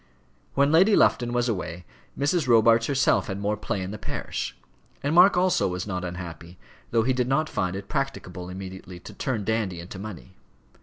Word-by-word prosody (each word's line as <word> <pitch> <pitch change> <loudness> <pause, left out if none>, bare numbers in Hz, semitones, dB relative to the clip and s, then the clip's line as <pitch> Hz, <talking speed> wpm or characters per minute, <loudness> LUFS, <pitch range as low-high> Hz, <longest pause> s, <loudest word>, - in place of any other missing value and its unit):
When 140 +1 +3
Lady 190 +6 +6
Lufton 120 -1 +3
was 120 0 +1
away 90 -5 -4 0.3
Mrs. 145 +1 +1
Robarts 115 -1 +5
herself 135 -3 +2
had 95 - -3
more 105 +1 0
play 100 -2 -3
in 95 - -5
the 105 - -7
parish. 100 - -4 0.5
And 145 +2 0
Mark 180 +3 +7
also 185 0 +3
was 90 0 -3
not 90 -3 -3
unhappy, 85 -1 -7 0.3
though 115 -1 +2
he 130 +3 +2
did 125 -1 0
not 155 +4 +1
find 90 -10 -2
it 100 0 -6
practicable 90 - -4
immediately 95 -1 -8
to - - -11
turn 120 -6 -2
Dandy 105 -5 -1
into 90 +3 -8
money. 95 - -9
105 Hz, 185 wpm, -25 LUFS, 90-130 Hz, 0.5 s, Mark